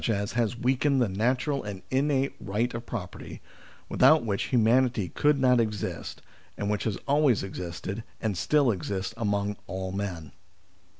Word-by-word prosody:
has 110 +2 0
weakened 130 +3 +2
the 120 - +3
natural 125 +8 0
and 100 -3 -7
innate 135 0 +1
right 105 +4 -1
of 120 0 -6
property, 100 -7 -6 0.5
without 155 -5 +5
which 100 -3 -1
humanity 120 -4 +2
could 145 - +2
not 125 -2 +4
exist, 105 -3 -3 0.3
and 100 0 -1
which 105 - -1
has 110 -4 -1
always 140 -7 +3
existed 95 +3 -5 0.2
and 110 -3 -1
still 140 - +3
exists 95 +1 -3
among 105 -2 -1
all 95 0 -4
men. 90 -7 -4
110 Hz, 140 wpm, -27 LUFS, 100-130 Hz, 0.5 s, without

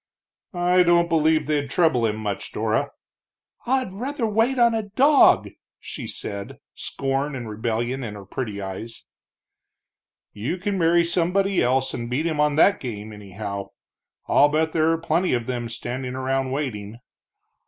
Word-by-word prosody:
"I 180 +1 +3
don't 170 -1 +4
believe 160 -1 +3
they'd 145 -2 -1
trouble 140 -8 +2
him 105 - -1
much, 105 -2 -4
Dora." - - 0 0.8
"I'd 255 -6 0
rather 255 +5 -3
wait 225 +5 +1
on 235 -1 +4
a 225 - 0
dog!" 265 +8 +4 0.3
she - - -7
said, 100 0 -5 0.2
scorn 135 +1 -2
and 120 -3 -6
rebellion 115 +4 -2
in 105 -3 -5
her 100 -1 -10
pretty 105 0 -5
eyes. 100 +4 -7 1.3
"You 120 - -3
can 195 +1 -2
marry 170 +1 +4
somebody 185 +3 +1
else 130 +2 +1
and 120 0 -4
beat 140 +6 -1
him 160 -3 -1
on 150 -1 +3
that 195 +6 +5
game, 110 -4 -6
anyhow. 100 0 -6 0.6
I'll 145 - +5
bet 160 +2 +1
there 160 0 +2
are 165 - +1
plenty 170 +1 0
of 120 -2 -2
them 120 -2 -3
standing 125 +2 -5
around 130 0 -1
waiting." 115 -6 -4
140 Hz, 155 wpm, -23 LUFS, 115-175 Hz, 1.3 s, that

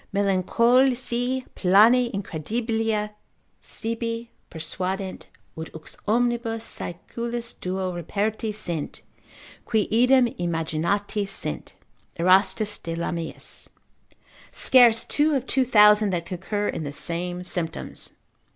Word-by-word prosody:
Melancholici 240 +6 +2
plane 225 +6 +5
incredibilia 215 +4 -2 0.5
sibi 230 +1 -4 0.2
persuadent, 185 +4 -4 0.3
ut 160 0 -6
vix 160 - -8
omnibus 235 0 0
saeculis 235 +5 -4
duo 185 0 -3
reperti 205 +6 -2
sint, 175 -7 -5 0.6
qui 220 -3 0
idem 250 +3 +5
imaginati 170 +5 -1
sint 195 - -5 0.4
(Erastus 190 +4 +3
de 165 0 -5
Lamiis), 170 -1 -5 0.8
scarce 235 -3 +5
two 300 0 +2
of 265 - -1
two 265 - +2
thousand 210 -3 +6
that 175 -3 -2
concur 200 +3 -3
in - - -3
the 145 - -4
same 175 +4 -3
symptoms. 175 -2 -4
210 Hz, 95 wpm, -24 LUFS, 180-235 Hz, 0.8 s, thousand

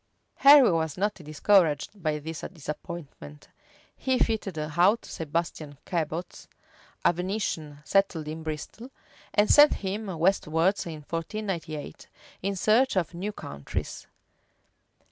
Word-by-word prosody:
Henry 275 -5 +8
was 160 -3 -1
not 205 +3 +1
discouraged 170 +3 +1
by 155 -2 0
this 160 +1 -6
disappointment: 150 - -8 0.5
he 260 -1 0
fitted 215 -7 -1
out 175 +9 +2
Sebastian 155 -2 -4
Cabot, 170 0 -4 0.6
a - - +5
Venetian, 175 -5 -3
settled 195 -6 +1
in 155 +1 -5
Bristol, 160 - -6 0.4
and 205 0 +3
sent 295 0 +7
him 205 +2 -4
westwards 175 +1 +1
in 155 -2 -7
1498, 165 -3 -5 0.3
in 195 +1 -1
search 220 +7 +3
of 180 -2 0
new 190 +5 -4
countries. 70 - -6
170 Hz, 110 wpm, -27 LUFS, 155-205 Hz, 0.6 s, Henry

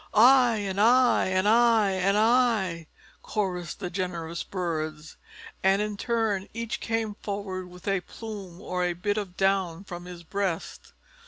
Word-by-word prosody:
"I!" 245 +1 +6
and 200 -2 -2
"I!" 245 +3 +5
and 185 +1 +1
"I!" 225 -2 +4
and 190 +2 +1
"I!" 215 -8 +2 0.3
chorused 180 -6 -3
the 180 - -4
generous 170 -3 -3
birds. 155 -4 -4 0.5
And 195 +1 +3
in 210 0 -2
turn 215 -3 -1
each 230 -1 -3
came 225 -2 -2
forward 200 -3 -4
with 180 +1 -13
a 195 -2 +1
plume 200 -5 -9
or 180 0 -2
a 175 0 0
bit 205 +5 -1
of 185 -3 -7
down 190 -2 +1
from 175 -2 -8
his 175 -1 -9
breast. 190 -1 -4
195 Hz, 150 wpm, -27 LUFS, 180-215 Hz, 0.5 s, I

